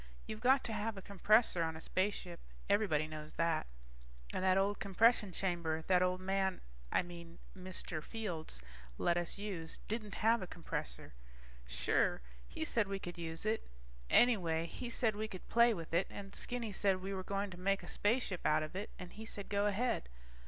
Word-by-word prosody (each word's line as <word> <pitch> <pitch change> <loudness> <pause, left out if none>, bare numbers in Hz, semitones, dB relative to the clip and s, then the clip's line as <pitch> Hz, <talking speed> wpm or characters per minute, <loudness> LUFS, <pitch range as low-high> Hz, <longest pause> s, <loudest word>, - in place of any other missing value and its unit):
You've 215 0 -6
got 265 +3 +5
to 225 - -3
have 215 0 -2
a - - -5
compressor 200 -1 +4
on 160 -1 0
a - - -8
spaceship, 185 0 -1 0.3
everybody 190 -8 +3
knows 155 0 -7
that. 165 - +1 0.7
And - - -1
that 190 0 +5
old 200 +1 +2
compression 210 +1 +4
chamber 170 -4 -1
that 180 0 +4
old 180 0 +2
man... 190 0 +1 0.3
I - - +3
mean 170 -1 -10 0.2
Mr. 185 -3 -5
Fields 170 - -4 0.3
let 170 - +2
us 175 +2 0
use 190 -6 -4
didn't 215 -1 -3
have 230 +1 +5
a 185 - -4
compressor. 160 - -5 0.5
Sure - - +2 0.3
he 110 - -4
said 210 +5 +2
we 195 0 -2
could 175 -2 -7
use 165 +2 -4
it. 220 +1 0 0.4
Anyway 170 -9 +4
he 240 +8 -5
said 225 -2 +1
we 215 +1 -2
could 185 -4 -9
play 235 0 +6
with 165 -6 -5
it, 175 +3 +3
and 195 -1 -8
Skinny 240 -3 -3
said 195 -1 +2
we 195 +2 -4
were 190 - -2
going 200 +1 -2
to 175 - -9
make 195 +1 +1
a - - -9
spaceship 205 -4 0
out 155 0 +3
of 155 +4 -6
it, 200 +3 -3
and 180 -1 -8
he 220 - -8
said 200 -2 -6
go 205 0 +2
ahead. 210 - 0
190 Hz, 190 wpm, -36 LUFS, 170-210 Hz, 0.7 s, play